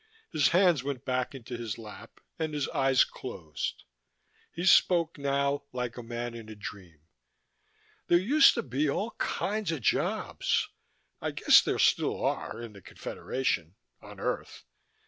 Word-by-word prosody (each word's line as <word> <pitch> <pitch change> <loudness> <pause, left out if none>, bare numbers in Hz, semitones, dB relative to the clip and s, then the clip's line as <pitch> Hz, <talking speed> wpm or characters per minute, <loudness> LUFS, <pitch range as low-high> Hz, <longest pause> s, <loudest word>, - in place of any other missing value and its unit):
His 155 -4 +3
hands 175 -6 +4
went 135 -3 -4
back 130 +1 -1
into 120 -1 -7
his 115 -4 -4
lap, 110 0 -12 0.2
and 155 -2 -2
his 145 -2 -1
eyes 135 -1 +4
closed. 80 - -6 0.7
He 175 - -4
spoke, 170 -4 +4
now, 140 0 0
like 125 -2 -3
a 120 - -6
man 120 0 -5
in 115 -2 -9
a 110 - -8
dream. 95 -6 -9 1.1
"There 175 - +5
used 265 - +5
to - - -1
be 140 +3 0
all 210 +11 -1
kinds 210 -3 -1
of 160 -5 -3
jobs. - - 0 0.5
I - - -1
guess - - +6
there - - -1
still - - +2
are, - - -2
in 115 -2 -8
the 100 - -13
Confederation. 90 -6 -3 0.3
On - - -12
Earth. - - -3
130 Hz, 150 wpm, -29 LUFS, 115-155 Hz, 1.1 s, guess